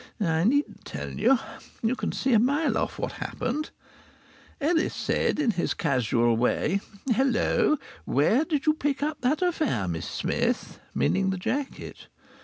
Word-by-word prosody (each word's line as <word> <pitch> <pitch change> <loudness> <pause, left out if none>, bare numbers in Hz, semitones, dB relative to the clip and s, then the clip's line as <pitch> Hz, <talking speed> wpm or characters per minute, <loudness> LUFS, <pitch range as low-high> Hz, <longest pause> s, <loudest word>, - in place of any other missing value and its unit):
I 165 -4 +1
needn't 285 +6 +1
tell - - -6
you. 270 - +3 0.5
You 230 +3 +2
can - - -2
see 265 -1 0
a 220 - +6
mile 285 +7 +2
off - - -1
what - - -2
had - - -5
happened. 305 +1 -3 0.9
Ellis 325 +3 +1
said - - 0
in 285 -6 +2
his 175 -4 -1
casual 120 -5 +2
way: 150 - +1 0.3
"Hello! 265 +4 +2 0.3
Where 185 - +3
did 305 -4 -1
you 305 - +5
pick 285 -2 -1
up 300 0 -2
that 290 +7 +1
affair, 310 - 0
Miss 85 -2 -3
Smith?" - - -1 0.2
Meaning 190 0 +2
the 190 - -1
jacket. 270 +9 -4
255 Hz, 155 wpm, -26 LUFS, -, 0.9 s, a